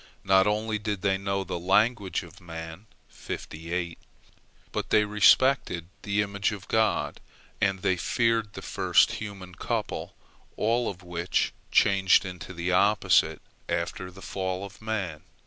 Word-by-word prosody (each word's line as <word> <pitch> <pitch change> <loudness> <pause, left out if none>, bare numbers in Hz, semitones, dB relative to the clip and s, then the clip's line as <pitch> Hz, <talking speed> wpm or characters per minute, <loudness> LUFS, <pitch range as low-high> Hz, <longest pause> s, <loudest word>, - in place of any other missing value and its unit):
Not 95 +1 +4
only 105 +1 0
did 105 -3 -3
they 95 -1 +2
know 100 0 -1
the 85 -1 -4
language 100 +1 +2
of 90 +2 -14
man, 80 +3 -8 1.8
but - - -3
they 105 - +4
respected 105 -3 +3
the 105 0 +1
image 100 0 -1
of 100 -4 -8
God, 110 -1 +1 0.4
and 95 -1 +1
they 95 -2 +2
feared 115 +2 +1
the - - -8
first - - +3
human 100 -4 -7
couple, - - -3 0.4
all 115 +2 +1
of 90 -2 -8
which 90 0 -1 0.2
changed 95 -1 +4
into 90 0 -7
the 90 0 -2
opposite 100 +3 +3 0.3
after 85 +2 -2
the 95 +1 -13
fall 95 0 -3
of 100 +2 -13
man. 100 -8 -3
95 Hz, 135 wpm, -27 LUFS, 90-105 Hz, 1.8 s, Not